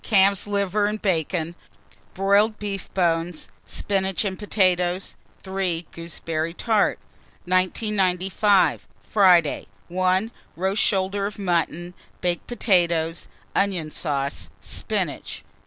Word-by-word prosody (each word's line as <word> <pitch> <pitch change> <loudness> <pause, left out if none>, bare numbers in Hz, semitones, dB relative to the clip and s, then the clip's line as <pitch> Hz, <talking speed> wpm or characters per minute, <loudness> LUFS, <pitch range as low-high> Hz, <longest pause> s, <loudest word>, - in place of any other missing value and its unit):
Calf's 200 -2 +3
liver 205 0 +1
and 210 +1 -2
bacon, 170 -3 0 0.6
broiled 200 +3 +3
beef 200 -2 -5
bones, 165 - 0 0.2
spinach 195 0 -1
and 190 -2 -3
potatoes. 185 -3 +1 0.3
3. 190 -3 -2
Gooseberry 165 0 -3
tart. 220 -1 +2 0.5
1995. 185 +1 +2 0.2
Friday. 180 -7 +4 0.2
1. 185 +4 +1 0.2
Roast 190 +4 0
shoulder 195 0 +1
of 210 - -8
mutton, 175 -2 -1 0.3
baked 175 -1 -1
potatoes, 170 -8 +1 0.3
onion 185 -6 0
sauce, 140 -4 -2
spinach. - - -3
185 Hz, 95 wpm, -24 LUFS, 175-200 Hz, 0.6 s, Friday